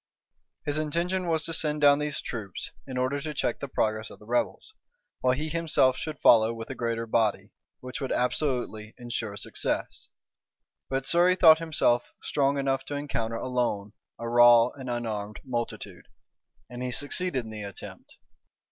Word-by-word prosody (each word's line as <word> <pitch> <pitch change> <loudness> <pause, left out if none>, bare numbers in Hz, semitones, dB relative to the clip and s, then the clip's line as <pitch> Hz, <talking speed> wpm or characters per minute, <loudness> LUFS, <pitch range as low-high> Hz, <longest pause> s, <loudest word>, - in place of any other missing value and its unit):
His 145 +1 +2
intention 175 +4 -1
was 160 -1 +1
to 165 - -3
send 150 -1 +1
down 145 0 +6
these 150 -1 -2
troops, 105 -6 -5 0.2
in 130 -1 -5
order 130 +3 0
to 155 0 -5
check - - -1
the 140 - -5
progress 110 -4 -1
of - - -12
the 105 - -17
rebels; 120 - -1 0.5
while 130 0 +2
he 150 +4 -3
himself 155 -5 +2
should 155 +3 -5
follow 115 0 +5
with 115 0 -7
a - - -3
greater 115 -1 -2
body, 110 -3 0 0.3
which 125 +1 -7
would 135 - -3
absolutely 125 -5 -1
insure 115 -4 -4
success. - - -2 0.8
But 135 0 -1
Surrey 175 +3 +5
thought 160 -3 +7
himself 155 -7 +1
strong 140 -1 0
enough 135 -1 0
to 145 - -5
encounter 115 -6 -3
alone 115 -5 -2 0.2
a 115 - -5
raw 120 0 +6
and 130 -2 -9
unarmed 110 -3 -4
multitude; 120 -3 -5 0.6
and 125 +1 -8
he 125 0 -2
succeeded 145 0 0
in 110 - -9
the 105 -1 -7
attempt. 100 -1 -9
125 Hz, 165 wpm, -27 LUFS, 115-150 Hz, 0.8 s, thought